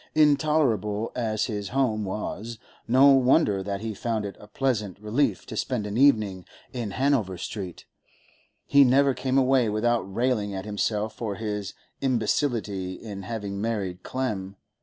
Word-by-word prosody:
Intolerable 140 -9 +2
as 110 -3 0
his 105 -4 -4
home 115 -5 0
was, 105 +3 -5 0.3
no 130 +4 +6
wonder 130 -6 +4
that 100 +1 -4
he 110 -1 -3
found 110 0 -2
it 100 - -6
a 105 - -13
pleasant 105 -6 -1
relief 110 +7 0
to - - -7
spend 120 -5 -2
an 105 0 -4
evening 110 -8 +3 0.3
in 120 -4 -3
Hanover 115 -5 +1
Street; 90 -1 -6 0.8
he 140 0 +6
never 135 +1 +4
came 130 +1 -1
away 130 -3 +3
without 115 +3 +1
railing 105 0 -1
at 95 +1 -5
himself 105 +1 -1
for 110 -4 -3
his 105 -2 -4 0.3
imbecility 110 -6 0
in 100 +1 -8
having 100 -1 -5
married 100 -5 -2
Clem. 100 -7 -3
110 Hz, 145 wpm, -26 LUFS, 100-130 Hz, 0.8 s, no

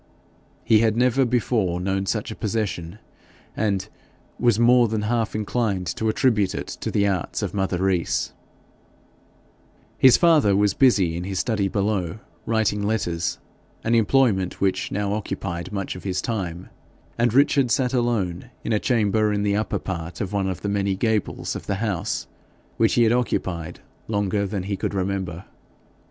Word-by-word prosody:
He 110 -2 +5
had 110 0 +2
never 125 +2 +3
before 115 -7 0
known 95 +1 -1
such 110 +1 -2
a - - -6
possession, 105 -5 -3 0.6
and 100 -2 0 0.5
was 120 -3 +3
more 120 0 +5
than 110 -1 -2
half 115 0 -1
inclined 105 -3 -1
to 110 - 0
attribute 110 -4 +2
it - - -3
to - - -5
the 100 - +1
arts 95 -4 -2
of - - -3
mother 95 -3 0
Rees. 95 -3 0 1.7
His 130 -2 +7
father 155 - +4
was 100 0 +3
busy 100 -11 +3
in 85 - -4
his 95 0 -3
study 105 -2 0
below, 100 -3 -1 0.3
writing 110 -2 +1
letters 90 -5 -1 0.5
an 115 - +1
employment 115 -5 +2
which 95 -1 0
now 100 0 -1
occupied 95 -4 -4
much 100 -2 -3
of 90 - -9
his 95 -2 -2
time; 90 -7 -4 0.4
and 120 0 +2
Richard 140 0 +3
sat 125 +2 +1
alone 120 -5 -1
in 115 - -1
a 105 - +2
chamber 110 -3 +2
in 100 0 0
the 100 -1 +1
upper 110 +1 -1
part 85 -2 -5
of 100 -1 -3
one 95 -1 0
of 95 - -5
the - - -3
many 100 -1 0
gables 110 0 -1
of - - -7
the 100 - 0
house, 100 -4 -2 0.5
which - - +3
he 120 - +5
had 115 - +4
occupied 90 -8 -2 0.3
longer 100 -1 0
than 95 -2 -3
he 100 +1 -2
could 100 - -3
remember. 95 -2 -3
105 Hz, 165 wpm, -23 LUFS, 95-115 Hz, 1.7 s, His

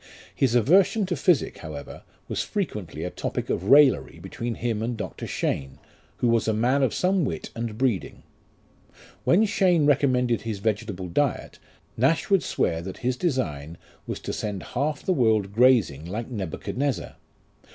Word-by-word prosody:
His 125 -3 +1
aversion 185 - +4
to 180 -1 -2
physic, 165 +1 +1
however, 75 -3 -8 0.3
was - - -2
frequently 100 - -4
a 90 - -3
topic - - -3
of 90 - -2
raillery 135 +3 +5
between 120 -1 -5
him 115 -3 -2
and 115 +1 -2
Dr. - - -6
Cheyne, 70 -1 -2 0.4
who 125 - +1
was 115 -1 +2
a 110 - +2
man 125 +6 +2
of 130 - +2
some 185 -1 +1
wit 135 - -4
and 115 -2 -5
breeding. 120 -7 -1 1.0
When 205 +6 +5
Cheyne 185 -6 +3
recommended 130 -4 +2
his 110 -3 -4
vegetable 105 -2 -2
diet, 140 +9 -1 0.4
Nash 140 - +1
would 195 -3 +5
swear 80 -1 -1
that 95 +2 -7
his 125 0 +1
design 85 - -2 0.3
was - - -4
to - - -4
send 100 -4 -4
half 145 +4 -1
the 185 - +1
world 110 - +2
grazing 110 - +3
like 110 +7 -5
Nebuchadnezzar. 125 - -3
120 Hz, 155 wpm, -25 LUFS, 100-140 Hz, 1.0 s, raillery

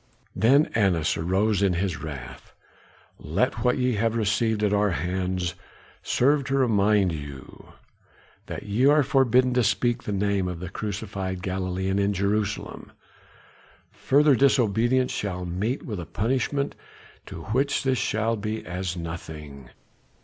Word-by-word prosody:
Then 135 +7 +5
Annas 90 -8 +2
rose 95 +5 +1
in 100 -2 +3
his 90 -2 -2
wrath. 65 -4 -8 0.7
"Let - - -1
what 125 - +2
ye 125 -1 +1
have 115 +2 +1
received 110 0 +1
at 105 -1 +2
our 105 0 +3
hands 90 +1 -2 0.5
serve 140 +3 +2
to 135 - -1
remind 105 -6 +3
you 70 -4 -9 0.7
that - - -6
ye 110 +6 +2
are 150 +1 +5
forbidden 130 -1 +3
to 125 -1 +2
speak 120 +3 +1
the - - -5
name 100 -1 0
of 90 -2 -5
the 90 0 -7
crucified 95 -3 -4
Galilean 95 +1 -1
in 100 +1 +1
Jerusalem. 100 +2 -2 1.0
Further 145 +2 +3
disobedience 125 -1 +2
shall 90 -3 -3
meet 100 +9 -2
with 105 -6 -5
a 85 - -7
punishment 130 - -1 0.5
to - - -8
which 140 +3 +1
this 130 -2 +1
shall 110 +2 0
be 110 +1 -4
as 90 0 -4
nothing." 75 -5 -8
100 Hz, 135 wpm, -25 LUFS, 90-120 Hz, 1.0 s, Then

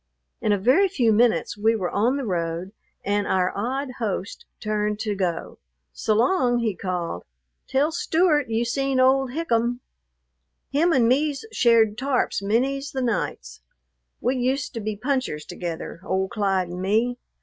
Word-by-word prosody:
In 215 - +1
a 205 - +3
very 255 - +4
few 245 - +2
minutes 230 0 +2
we 220 +2 +2
were 185 -5 -2
on 240 +7 +1
the 275 - -3
road, 170 -1 -2 0.3
and 205 0 0
our 185 -1 +1
odd 260 +6 -2
host 205 -3 -3
turned 210 0 -1
to 215 -2 -1
go. 180 -4 -3 0.3
"S'long!" 245 - +2
he 225 -3 0
called. 175 - -3 0.4
"Tell 285 +4 +1
Stewart 315 -4 +2
you 225 +1 0
seen 270 +2 0
old 265 0 +4
Hikum. 245 -6 0 0.9
Him 320 +5 +3
and 250 -7 +4
me's 285 - +1
shared 230 - +3
tarps 265 -6 0
many's 270 +7 0
the 265 -1 -1
nights. 65 - -3 0.6
We 255 +2 0
used 255 +2 -1
to 230 - -4
be 215 0 -3
punchers 250 - -2
together, 170 -1 -6
old 190 0 -1
Clyde 195 -5 0
and 180 +1 -6
me. 225 +6 +1
230 Hz, 150 wpm, -24 LUFS, 200-265 Hz, 0.9 s, very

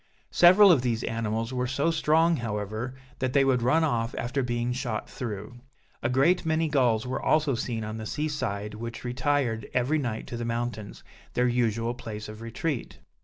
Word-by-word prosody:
Several 185 +3 +7
of 150 -8 +4
these 120 -3 -1
animals 115 +1 -2
were 125 0 -1
so 140 +6 +1
strong, 160 +1 +3
however, 110 +2 -4 0.2
that 130 -1 -1
they 140 -1 +4
would 130 -2 +2
run 150 +7 +3
off 120 -6 0
after 125 +3 -1
being 120 -1 -1
shot 120 -4 -3
through. 110 0 -6 0.4
A 120 - 0
great 140 +9 +3
many 160 -1 +1
gulls 125 -6 +2
were 125 - -3
also 155 -3 +2
seen 115 -1 -3
on 110 +1 -5
the 110 -1 -5
sea 150 +7 -2
side 105 -8 -3
which 115 +2 -7
retired 125 -3 -1
every 130 +5 +2
night 120 -5 -3
to 120 - -6
the 120 - -3
mountains, 115 -2 -4 0.3
their 125 0 +3
usual 115 -1 0
place 110 -3 -7
of 110 +1 -9
retreat. 115 +4 -4
120 Hz, 180 wpm, -27 LUFS, 115-140 Hz, 0.4 s, Several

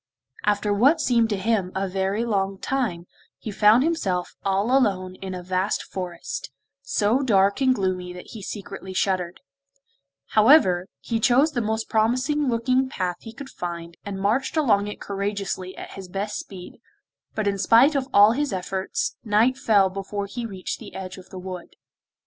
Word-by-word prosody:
After 205 0 +1
what 270 +11 +4
seemed 235 -6 +2
to 205 - 0
him 195 -2 0
a 195 +1 -1
very 195 +4 -1
long 195 -3 0
time, 220 -9 -2 0.3
he 215 - -6
found 215 +5 +5
himself 195 - -1
all 200 +6 +1
alone 190 -8 +1
in 190 -1 -5
a 180 - -7
vast 185 +2 -1
forest, 180 -3 -6 0.3
so 240 -2 +1
dark 200 -3 +3
and 260 -1 +4
gloomy 185 -3 -2
that 180 0 -10
he 220 - -8
secretly 195 -2 -7
shuddered; 185 -3 -1 0.9
however, 215 - +5
he 230 -1 -2
chose 260 +7 +4
the 245 -5 -1
most 220 0 -2
promising 255 +7 +1
looking 255 +3 +1
path 180 -7 -2
he 225 - -10
could 265 +4 -10
find, 170 -1 -6
and 200 -1 -5
marched 240 +10 0
along 205 -9 +3
it 210 - -7
courageously 200 -2 -4
at - - -8
his 195 -1 -9
best 200 +3 -3
speed, 185 -2 -10 0.6
but 215 -2 -1
in 200 -1 0
spite 240 +9 +5
of 270 -2 -1
all 205 +2 +7
his 285 +3 -1
efforts, 190 - -3
night 225 +3 +3
fell 205 -6 +3
before 195 +1 -4
he 230 +4 -5
reached 190 -4 -5
the 220 - -11
edge 190 0 -7
of 185 - -15
the 190 - -9
wood. 180 -1 -8
205 Hz, 170 wpm, -24 LUFS, 190-235 Hz, 0.9 s, all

